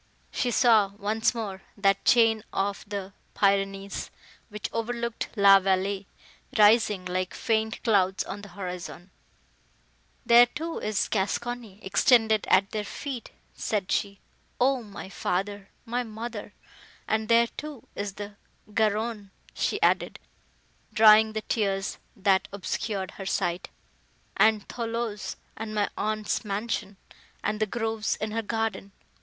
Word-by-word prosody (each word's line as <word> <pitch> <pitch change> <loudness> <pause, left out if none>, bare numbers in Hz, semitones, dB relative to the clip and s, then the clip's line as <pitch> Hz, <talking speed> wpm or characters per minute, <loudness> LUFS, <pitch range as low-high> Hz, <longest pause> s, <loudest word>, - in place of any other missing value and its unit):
She 250 - 0
saw, 220 -5 +4
once 220 +4 0
more, 200 -4 -4 0.2
that 195 -1 +2
chain 225 -2 +5
of 200 +1 -1
the 200 -1 -5 0.2
Pyrenees, 195 0 0 0.4
which 210 -1 -4
overlooked 235 0 -3
La 200 -2 +8
Vallée, 195 +1 0 0.5
rising, 210 -3 +5
like 185 0 -2
faint 220 -1 -1
clouds, 190 -5 +2
on 200 +1 -7
the 205 - -10
horizon. 180 -1 -7 1.1
"There, 240 0 +8
too, 325 +6 -5
is 215 -1 0
Gascony, 225 +1 -2
extended 220 +2 +3
at 195 +1 +4
their 215 -1 -2
feet!" 255 +3 -6 0.2
said 205 -4 -2
she, 200 -1 -1 0.4
"O 260 0 +3
my 205 -4 -9
father,—my 200 +6 -3
mother! 220 -2 -7 0.5
And 220 0 0
there, 235 0 +6
too, 290 +1 -9
is 200 -1 -4
the 205 0 -8 0.4
Garonne!" 215 -1 0 0.2
she - - -1
added, - - +2 0.7
drying 220 0 +7
the 220 0 -3
tears, 195 -3 -1 0.2
that 195 -1 +2
obscured 195 0 -3
her 195 - -8
sight,—"and 200 +4 -1
Thoulouse, 230 -3 -3 0.2
and 215 0 -6
my 205 -1 +1
aunt's 215 +1 -1
mansion—and 210 0 -5
the 215 - +1
groves 225 -1 -1
in 215 0 -4
her 225 +1 -1
garden! 225 -2 -3
210 Hz, 120 wpm, -27 LUFS, 195-225 Hz, 1.1 s, La